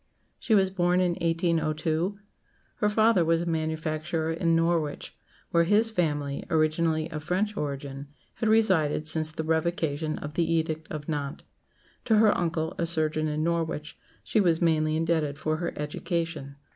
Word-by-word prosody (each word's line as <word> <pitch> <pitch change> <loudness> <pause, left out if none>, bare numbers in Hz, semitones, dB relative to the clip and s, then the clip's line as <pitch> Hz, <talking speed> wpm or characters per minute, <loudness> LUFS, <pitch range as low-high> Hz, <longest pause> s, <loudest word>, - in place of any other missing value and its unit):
She 220 - +2
was 190 -2 +3
born 180 -1 +2
in 180 -1 +2
1802. 165 +1 0 0.6
Her 210 -3 +2
father 215 -3 +4
was 165 0 +2
a - - -3
manufacturer 160 0 -2
in 165 0 +1
Norwich, 165 -3 0 0.4
where 170 0 +4
his 215 +5 +3
family, 145 -7 -1
originally 160 0 +1
of 155 -1 -5
French 200 +6 -1
origin, 140 -2 -5 0.3
had 220 - 0
resided 180 -9 +3
since 155 0 +3
the 160 0 -4
Revocation 160 -1 -1
of 145 0 -7
the 165 0 0
Edict 160 -1 -1
of 150 -1 -6
Nantes. 145 -3 -4 0.6
To 225 - +3
her 215 -1 +5
uncle, 165 -1 -1
a 170 - 0
surgeon 155 -1 +1
in 155 0 -1
Norwich, 165 -2 -2 0.3
she 215 - +1
was 170 -4 +2
mainly 155 -2 +2
indebted 160 -3 0
for 155 +1 -1
her 170 +1 -3
education. 160 -1 -3
160 Hz, 155 wpm, -27 LUFS, 155-175 Hz, 0.6 s, her